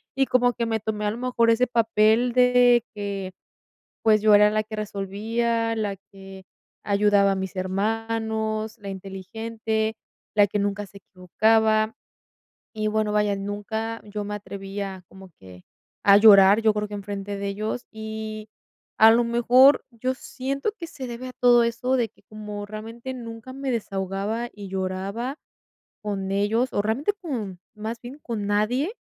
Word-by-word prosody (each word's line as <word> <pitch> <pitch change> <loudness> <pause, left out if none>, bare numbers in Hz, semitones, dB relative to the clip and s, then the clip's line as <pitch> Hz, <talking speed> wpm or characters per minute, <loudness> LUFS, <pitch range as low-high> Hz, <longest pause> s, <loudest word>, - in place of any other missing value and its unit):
Y 270 +1 +3
como 245 -1 +3
que 235 -1 -2
me 225 -1 -1
tomé, 210 0 -3
a 210 - +1
lo 220 - -6
mejor, 240 -2 +2
ese 245 +2 +3
papel 225 +1 +3
de 250 -1 +5
que, 200 -2 -4 0.7
pues, 215 -2 +4
yo 215 -1 +6
era 210 0 +7
la 215 0 +1
que 215 0 -9
resolvía, 225 +3 -2
la 205 -3 -2 0.2
que 195 -1 -12 0.4
ayudaba 200 -1 +3
a - - +1
mis 190 0 -5
hermanos, 220 +3 -2
la 200 -2 -9
inteligente, 220 +3 -4 0.4
la 205 -1 +5
que 205 - -2
nunca 205 0 -2
se 200 - -14
equivocaba. 215 +4 +1 0.8
Y 215 0 -2
bueno, 215 0 0
vaya, 210 -1 +1
nunca 215 +3 -4
yo 210 0 -5
me 210 - -4
atreví 200 -1 -7
a 190 -2 -5
como 190 -1 -14
que 90 -1 -14 0.4
a 200 0 +8
llorar, 200 -1 +8
yo 220 -1 +3
creo 210 0 -2
que 205 - -7
enfrente 200 0 -5
de 200 - -3
ellos, 215 +4 -4
y, 220 0 -6 0.5
a 220 +1 +8
lo 235 - +4
mejor, 245 +4 +5
yo 255 +3 -2
siento 275 +8 -4
que 335 - -7
se 270 -5 -7
debe 245 +2 -6
a - - -8
todo 245 -1 +5
eso 235 +3 -1
de 240 -3 0
que 215 - -29
como 210 -1 -7
realmente 225 +4 -7
nunca 230 0 -8
me 270 0 -4
desahogaba 200 +1 -3
y 205 -1 -9
lloraba 195 +8 -3 0.6
con 195 -2 -3
ellos, 220 +5 +1
o, 205 - +1
realmente 245 - 0
con 220 - -5
más 220 +2 -5
bien 255 +4 -10
con 220 -4 -4
nadie. 245 - 0
215 Hz, 165 wpm, -24 LUFS, 200-235 Hz, 0.8 s, a